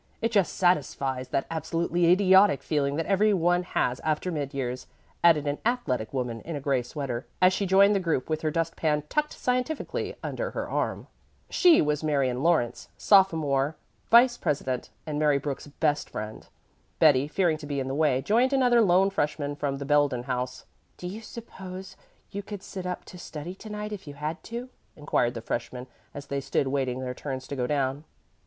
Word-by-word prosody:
It 230 Hz, -, 0 dB
just 200 Hz, -5 st, +2 dB
satisfies 135 Hz, -7 st, 0 dB
that 135 Hz, -, -1 dB
absolutely 170 Hz, +2 st, +1 dB
idiotic 190 Hz, -2 st, +5 dB
feeling 140 Hz, -2 st, 0 dB
that 165 Hz, +1 st, -1 dB
every 205 Hz, +1 st, +3 dB
one 175 Hz, 0 st, +2 dB
has 125 Hz, -8 st, -1 dB
after 155 Hz, +3 st, -1 dB
mid 145 Hz, -4 st, -3 dB
years," 130 Hz, -3 st, -4 dB, 0.4 s
added 160 Hz, -4 st, +5 dB
an 145 Hz, 0 st, -2 dB
athletic 220 Hz, -, -1 dB
young 135 Hz, -, -3 dB
woman 120 Hz, -3 st, -3 dB
in 165 Hz, -, -6 dB
a -, -, -3 dB
gray 135 Hz, -2 st, +1 dB
sweater, 125 Hz, -1 st, -5 dB
as 185 Hz, 0 st, +5 dB
she 200 Hz, +1 st, -1 dB
joined 195 Hz, +2 st, +6 dB
the 200 Hz, -, +2 dB
group 165 Hz, -8 st, -1 dB
with 155 Hz, 0 st, -2 dB
her 155 Hz, -, 0 dB
dust 165 Hz, +1 st, -1 dB
pan 150 Hz, -2 st, 0 dB
tucked 300 Hz, 0 st, 0 dB
scientifically 255 Hz, +5 st, -2 dB
under -, -, -3 dB
her -, -, -4 dB
arm. -, -, -2 dB, 0.5 s
She 350 Hz, -, +6 dB
was 150 Hz, 0 st, -1 dB
Marion 135 Hz, -4 st, +1 dB
Lawrence, 160 Hz, -7 st, +1 dB
sophomore 160 Hz, -7 st, +3 dB, 0.3 s
vice 240 Hz, +1 st, +6 dB
president, 130 Hz, -3 st, -2 dB, 0.2 s
and 150 Hz, -2 st, -3 dB
Mary 150 Hz, -2 st, +3 dB
Brooks's 145 Hz, +1 st, -5 dB
best 150 Hz, -1 st, 0 dB
friend. 110 Hz, +1 st, -7 dB, 0.5 s
Betty, 145 Hz, -3 st, +5 dB
fearing 165 Hz, 0 st, +1 dB
to 150 Hz, -1 st, -9 dB
be 145 Hz, -1 st, -2 dB
in 130 Hz, -, -3 dB
the 135 Hz, -, -3 dB
way, 140 Hz, -3 st, +2 dB
joined 240 Hz, -, +2 dB
another 250 Hz, -3 st, +4 dB
lone 195 Hz, -1 st, +4 dB
freshman 145 Hz, -5 st, -1 dB
from 140 Hz, -1 st, -2 dB
the 140 Hz, -, -5 dB
Belden 145 Hz, -4 st, +2 dB
House. 125 Hz, 0 st, -4 dB, 0.3 s
"Do -, -, -9 dB
you 200 Hz, +5 st, -5 dB
suppose 190 Hz, -5 st, -9 dB, 0.4 s
you 200 Hz, -, -4 dB
could 205 Hz, -1 st, -8 dB
sit 185 Hz, -2 st, -6 dB
up 180 Hz, -, -4 dB
to 180 Hz, -, -11 dB
study 160 Hz, +1 st, -7 dB
to 210 Hz, +3 st, -11 dB
night 210 Hz, 0 st, -5 dB
if 200 Hz, -5 st, -8 dB
you 145 Hz, -, -8 dB
had 150 Hz, +4 st, -4 dB
to?" 240 Hz, +2 st, -6 dB, 0.3 s
inquired 130 Hz, -5 st, 0 dB
the 115 Hz, -, -5 dB
freshman 125 Hz, +2 st, -4 dB, 0.3 s
as 145 Hz, 0 st, -8 dB
they 140 Hz, 0 st, -3 dB
stood 135 Hz, 0 st, 0 dB
waiting 130 Hz, -2 st, -1 dB
their 125 Hz, -1 st, -3 dB
turns 130 Hz, -1 st, -6 dB
to 140 Hz, -, -3 dB
go 125 Hz, -2 st, -1 dB
down. 140 Hz, 0 st, -1 dB
155 Hz, 190 wpm, -27 LUFS, 135-190 Hz, 0.5 s, joined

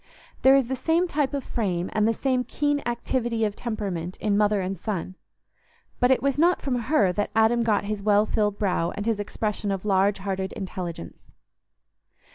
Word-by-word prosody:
There 265 Hz, +1 st, +7 dB
is 270 Hz, -2 st, +3 dB
the 265 Hz, +3 st, -2 dB
same 330 Hz, +7 st, +1 dB
type 290 Hz, -4 st, 0 dB
of 280 Hz, -2 st, -3 dB
frame 185 Hz, -6 st, -2 dB
and 215 Hz, 0 st, +2 dB
the -, -, +4 dB
same 255 Hz, +1 st, 0 dB
keen 290 Hz, +3 st, -1 dB
activity 235 Hz, -1 st, -1 dB
of 205 Hz, -1 st, -2 dB
temperament 195 Hz, -7 st, -4 dB
in 210 Hz, -2 st, 0 dB
mother 210 Hz, 0 st, +3 dB
and 190 Hz, +1 st, -2 dB
son, 185 Hz, -1 st, -4 dB, 0.9 s
but 250 Hz, -, +3 dB
it 260 Hz, -, +3 dB
was 275 Hz, 0 st, +1 dB
not 350 Hz, +3 st, +4 dB
from 275 Hz, -, -2 dB, 0.2 s
her 210 Hz, -12 st, +4 dB
that 205 Hz, +3 st, -1 dB
Adam 225 Hz, +2 st, +4 dB
got 215 Hz, -3 st, +1 dB
his 210 Hz, 0 st, -3 dB
well 210 Hz, +1 st, +3 dB
filled 210 Hz, -2 st, 0 dB
brow 180 Hz, -5 st, 0 dB
and 205 Hz, -, -4 dB
his 225 Hz, -2 st, 0 dB
expression 210 Hz, 0 st, -3 dB
of 195 Hz, 0 st, -3 dB
large 195 Hz, 0 st, +2 dB
hearted 190 Hz, -1 st, -3 dB
intelligence. 180 Hz, -, -7 dB
215 Hz, 185 wpm, -25 LUFS, 195-250 Hz, 0.9 s, There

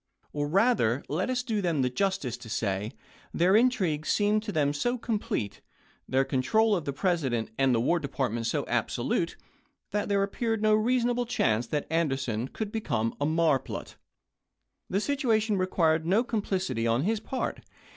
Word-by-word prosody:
Or 145 Hz, 0 st, -1 dB
rather, 170 Hz, -, +2 dB
let 170 Hz, -, -1 dB
us 250 Hz, -1 st, 0 dB
do 220 Hz, -4 st, -1 dB
them 165 Hz, -7 st, +1 dB
the 125 Hz, -, +1 dB
justice 165 Hz, -, -1 dB
to 120 Hz, -2 st, -11 dB
say, 105 Hz, +1 st, -2 dB, 0.4 s
their 180 Hz, +4 st, +4 dB
intrigue 195 Hz, -11 st, +2 dB
seemed 210 Hz, +1 st, +2 dB
to 215 Hz, -1 st, -5 dB
them 145 Hz, -5 st, +1 dB
so 245 Hz, +12 st, 0 dB
complete, 215 Hz, -, -3 dB, 0.5 s
their 135 Hz, +1 st, +2 dB
control 205 Hz, -, +2 dB
of 170 Hz, -, -3 dB
the 140 Hz, -, -1 dB
President 135 Hz, -, -1 dB
and 135 Hz, -1 st, +3 dB
the -, -, +2 dB
War 170 Hz, +9 st, +2 dB
Department 130 Hz, -6 st, -2 dB
so -, -, 0 dB
abso -, -, -1 dB
lute, -, -, 0 dB, 0.5 s
that 205 Hz, 0 st, -1 dB
there 200 Hz, -1 st, +2 dB
appeared 225 Hz, +2 st, -1 dB
no 215 Hz, 0 st, +4 dB
reasonable 240 Hz, +2 st, +2 dB
chance 115 Hz, -, +1 dB
that 150 Hz, +2 st, -2 dB
Anderson 135 Hz, -8 st, 0 dB
could 210 Hz, +7 st, -5 dB
become 115 Hz, -, -1 dB
a 145 Hz, -, +2 dB
marplot. 155 Hz, -4 st, 0 dB, 1.0 s
The 195 Hz, -, +1 dB
situation 225 Hz, -5 st, +1 dB
required 165 Hz, -3 st, +2 dB
no 195 Hz, +8 st, +3 dB
complicity 190 Hz, -, -1 dB
on 115 Hz, +4 st, +2 dB
his 220 Hz, +4 st, +1 dB
part. 255 Hz, +4 st, -3 dB
170 Hz, 165 wpm, -28 LUFS, 135-215 Hz, 1.0 s, their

